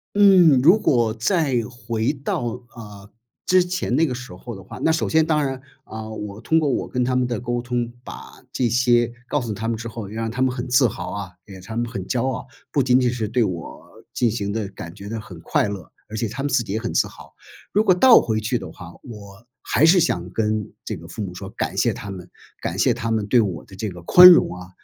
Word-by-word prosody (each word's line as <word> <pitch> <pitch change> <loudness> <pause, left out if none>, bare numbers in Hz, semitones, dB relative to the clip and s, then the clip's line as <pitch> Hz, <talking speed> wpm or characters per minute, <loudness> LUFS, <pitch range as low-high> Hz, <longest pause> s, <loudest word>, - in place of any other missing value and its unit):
嗯， 185 -9 +6
如 175 +10 +6
果 120 - +2
再 130 - +1
回 115 -1 -2
到， 140 -3 -3 0.3
呃， 105 -3 -12 0.3
之 185 0 +4
前 180 -8 -2
那 160 +4 +3
个 130 -5 -3
时 125 -6 -9
候 115 +5 -9
的 95 - -11
话 - - -10
那 160 - +2
首 160 - 0
先 160 0 +3
当 155 -2 +1
然， 135 -1 -4 0.2
啊， 110 -2 -8
我 105 -1 -7
通 160 +7 +2
过 150 -3 0
我 130 - -1
跟 125 -1 -1
他 125 +1 0
们 125 -1 +1
的 120 -2 -3
沟 120 0 -2
通， 120 -1 -2
把 - - -11
这 125 - 0
些 120 0 +2 0.2
告 145 - 0
诉 115 -3 -4
他 110 +2 -4
们 115 -1 -1
之 115 +1 -6
后， 115 -2 -7
让 115 +2 -4
他 125 +3 -4
们 130 -1 +2
很 125 0 -4
自 125 0 +4
豪 90 -4 -6
啊， 100 -2 -6
也 100 - -12
让 95 - -11
他 110 +4 -7
们 120 0 -1
很 100 -4 -5
骄 130 0 0
傲， 130 0 -4 0.2
不 140 - +2
仅 125 0 +4
仅 125 -2 +1
是 115 -3 -3
对 115 +3 +1
我 90 -6 -6 0.3
进 120 -2 +1
行 100 -3 -3
的 105 -1 -3
感 85 -4 -9
觉 100 0 -10
得 115 +2 -4
很 90 -6 -12
快 - - 0
乐， 100 -5 -7 0.2
而 110 - -6
且 115 - -1
他 115 +6 -6
们 145 - -1
自 125 -2 +2
己 100 - -5
也 110 - -1
很 115 +1 -4
自 - - +2
豪。 - - -15 0.4
如 210 - +3
果 190 - +5
倒 235 +7 +7
回 110 -1 -1
去 110 +3 -1
的 - - -8
话， 85 -2 -11
我 105 -2 -12 0.2
还 155 - +2
是 175 +3 +6
想 90 - 0
跟 110 0 -2
这 - - -4
个 - - -12
父 - - -7
母 90 -3 -5
说， 95 +2 -7
感 - - -4
谢 - - +2
他 100 - -8
们， 90 -2 -8 0.3
感 90 +3 -4
谢 130 - +4
他 115 -1 -2
们 110 -2 -1
对 120 +3 +4
我 95 -8 -1
的 95 - -14
这 105 +2 -4
个 90 -2 -10
宽 180 - +9
容 170 - +5
啊， 90 0 -10
115 Hz, 270 characters per minute, -22 LUFS, 105-130 Hz, 0.4 s, 宽